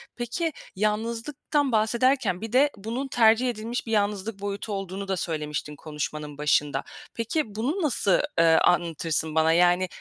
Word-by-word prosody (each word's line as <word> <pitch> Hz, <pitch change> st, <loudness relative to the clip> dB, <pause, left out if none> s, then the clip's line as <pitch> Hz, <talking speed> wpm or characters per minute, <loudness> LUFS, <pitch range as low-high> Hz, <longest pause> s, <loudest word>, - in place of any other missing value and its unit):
Peki, 245 Hz, +8 st, -2 dB, 0.2 s
yalnızlıktan 230 Hz, +7 st, -1 dB
bahsederken 225 Hz, -2 st, +2 dB
bir 225 Hz, -1 st, -5 dB
de 275 Hz, +3 st, +5 dB
bunun 230 Hz, +7 st, -4 dB
tercih 235 Hz, 0 st, +4 dB
edilmiş 230 Hz, +1 st, -4 dB
bir -, -, -4 dB
yalnızlık 205 Hz, -1 st, -1 dB
boyutu 205 Hz, +1 st, -4 dB
olduğunu 195 Hz, 0 st, -5 dB
da 190 Hz, -1 st, -1 dB
söylemiştin 150 Hz, -3 st, -3 dB
konuşmanın 150 Hz, 0 st, -5 dB
başında. 145 Hz, -1 st, +1 dB, 0.3 s
Peki, 230 Hz, -1 st, -2 dB
bunu 285 Hz, -, -1 dB
nasıl, 220 Hz, -, +2 dB, 0.2 s
eee, 165 Hz, -, +6 dB
anlatırsın 165 Hz, -2 st, +2 dB
bana? 160 Hz, 0 st, +4 dB
Yani, 175 Hz, +2 st, +4 dB
205 Hz, 140 wpm, -26 LUFS, 165-235 Hz, 0.3 s, eee